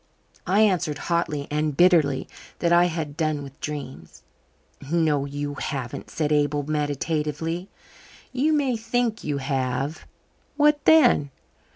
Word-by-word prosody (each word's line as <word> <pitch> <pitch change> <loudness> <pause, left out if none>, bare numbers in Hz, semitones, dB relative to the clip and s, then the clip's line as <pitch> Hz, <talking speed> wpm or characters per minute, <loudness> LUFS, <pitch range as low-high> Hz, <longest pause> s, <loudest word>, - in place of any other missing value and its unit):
I 200 +3 +3
answered 180 -8 +2
hotly 155 -3 -1
and 150 -1 -1
bitterly 165 -7 +4 0.3
that 170 0 +1
I 175 +1 +6
had 160 -4 -3
done 155 -3 -1
with 140 0 -12
dreams. 135 - -7 0.7
"No, 155 -4 +2
you 145 +1 -4
haven't," 135 -4 -5
said 150 -2 -2
Abel 145 -1 +1
meditatively. 155 +3 -2 0.6
"You 275 +5 +1
may 280 -5 +1
think 225 0 -1
you 145 -2 -2
have. 135 +2 -2 0.5
What 295 0 +3
then? 255 - +5
155 Hz, 125 wpm, -24 LUFS, 145-180 Hz, 0.7 s, I